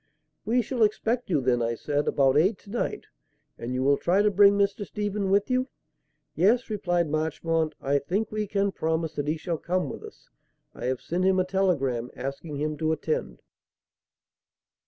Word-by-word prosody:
"We 240 +2 +2
shall 245 +2 -3
expect 225 +3 +1
you 155 -6 +2
then," 125 -1 +1
I 115 0 0
said, 145 +5 -1
"about 135 -1 +3
eight 190 +7 +3
to 200 - -14
night, 235 - -2 0.5
and 120 - -5
you 130 - 0
will 140 +1 +4
try 190 +4 +2
to 210 - +3
bring 200 +1 +6
Mr. 200 +1 +1
Stephen 205 -1 -2
with 200 +5 +2
you?" 255 +1 +1 0.7
"Yes," 225 +6 +2
replied 175 -5 0
Marchmont; 160 +1 -1
"I 140 +1 +1
think 195 +10 -2
we 215 -1 -2
can 200 0 0
promise 160 -2 -1
that 145 -1 -3
he 155 +2 0
shall 165 0 -3
come 180 +1 -1
with - - -8
us. 435 - -13 0.5
I - - -7
have 130 0 -1
sent 175 +2 -2
him 190 0 +3
a 185 - +2
telegram 145 -11 0
asking 140 +3 -5
him 150 +1 -2
to 160 0 0
attend." 465 - -3
175 Hz, 180 wpm, -26 LUFS, 145-205 Hz, 0.7 s, bring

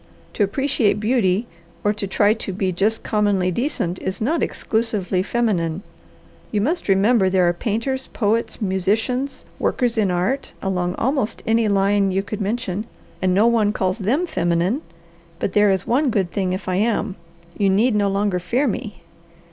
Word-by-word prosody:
"To - - -4
appreciate 215 -2 +1
beauty 215 -2 +1 0.4
or 210 - +2
to 210 -1 -4
try 205 +2 +3
to 220 -3 -5
be 190 0 -1
just 205 +5 0
commonly 205 -4 +1
decent 185 - -2
is 190 - -3
not 300 +9 0
exclusively 215 -5 -1
feminine. 190 -5 -1 0.7
You 210 - +1
must 310 - -1
remember 195 +1 +4
there 185 -2 +3
are 175 - +3
painters, 230 +8 -2
poets, 225 +1 -1
musicians, 220 +8 -1
workers 240 -3 0
in 205 -3 +2
art 185 +10 -1
along 180 -2 -1
almost 265 -3 -1
any 225 0 +2
line 200 0 +2
you 195 +1 0
could 210 +1 -5
mention, 215 0 -2 0.3
and 185 -1 +2
no 205 +3 +4
one 225 -3 +3
calls 185 +2 -1
them 250 - +1
feminine, 175 - 0 0.6
but 185 - -2
there 205 0 +5
is 190 -1 +1
one 275 +4 +2
good 190 -6 0
thing 190 -2 -1
if 185 +1 -4
I 185 0 0
am. 210 -2 0 0.4
You 200 -1 +2
need 215 +6 +3
no 205 -1 +2
longer 195 -1 0
fear 235 +11 0
me. 210 -3 -4
205 Hz, 165 wpm, -21 LUFS, 190-230 Hz, 0.7 s, there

